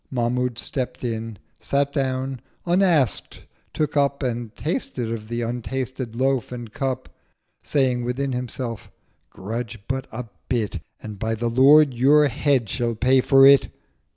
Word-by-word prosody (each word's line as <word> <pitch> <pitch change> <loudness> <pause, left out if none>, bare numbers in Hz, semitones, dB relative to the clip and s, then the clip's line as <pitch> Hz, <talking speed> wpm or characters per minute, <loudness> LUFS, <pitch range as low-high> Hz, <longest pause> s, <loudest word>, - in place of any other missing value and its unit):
Mahmud 125 -1 -1
stept 125 0 -4
in—sat 115 +5 -3
down—unask'd 135 - 0 0.3
took 150 -1 -2
up 140 0 +1
And 120 -3 -3
tasted 160 - -3
of 110 -2 -5
the 120 +1 -3
untasted 125 0 -4
Loaf 130 -1 0
and 120 -3 -7
Cup, 135 -2 -3 0.5
Saying 130 -4 +1
within 130 +3 -2
himself, 125 -2 -5 0.4
'Grudge 115 +3 -5
but 130 0 -3
a 120 +3 -5 0.3
bit, 110 -7 -1 0.2
1060 - - -11
And, 105 -2 -8
by 115 +1 -1
the 120 +1 -1
Lord, 140 +3 +6
your 145 +5 +5
Head 130 -1 +1
shall 115 +2 -1
pay 130 +3 +3
for 135 +1 +6
it!' 140 0 +7
125 Hz, 135 wpm, -23 LUFS, 115-135 Hz, 0.5 s, it